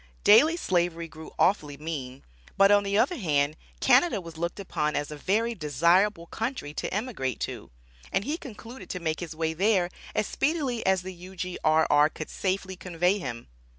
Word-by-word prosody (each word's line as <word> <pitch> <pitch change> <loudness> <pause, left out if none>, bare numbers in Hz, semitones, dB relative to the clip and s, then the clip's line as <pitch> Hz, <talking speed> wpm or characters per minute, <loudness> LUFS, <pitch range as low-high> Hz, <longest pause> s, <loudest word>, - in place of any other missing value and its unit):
Daily 300 +11 +6
slavery 175 - 0
grew 160 0 -11
awfully 150 -7 +2
mean, 140 -4 -6 0.3
but 195 +1 +6
on 205 0 +6
the 200 0 0
other 355 - +2
hand, 150 - +1 0.2
Canada 345 - +4
was 165 -3 -10
looked 170 +4 -3
upon 155 -6 -2
as 145 +1 -2
a - - -5
very 220 +10 0
desirable 170 - +2
country 220 - -4
to - - -4
emigrate 200 - -2
to, - - -5 0.4
and 200 - 0
he 295 - -1
concluded 240 - -10
to 180 - -3
make 160 -2 -2
his 170 -2 -6
way 160 0 -1
there, 185 0 +2 0.2
as 215 - +1
speedily 275 -5 -1
as 190 -1 +3
the 185 0 -6
U.G.R.R. 170 -4 +1
could 155 - -8
safely 190 0 -2
convey 180 +2 0
him. 120 -8 -6
180 Hz, 170 wpm, -27 LUFS, 155-205 Hz, 0.4 s, Daily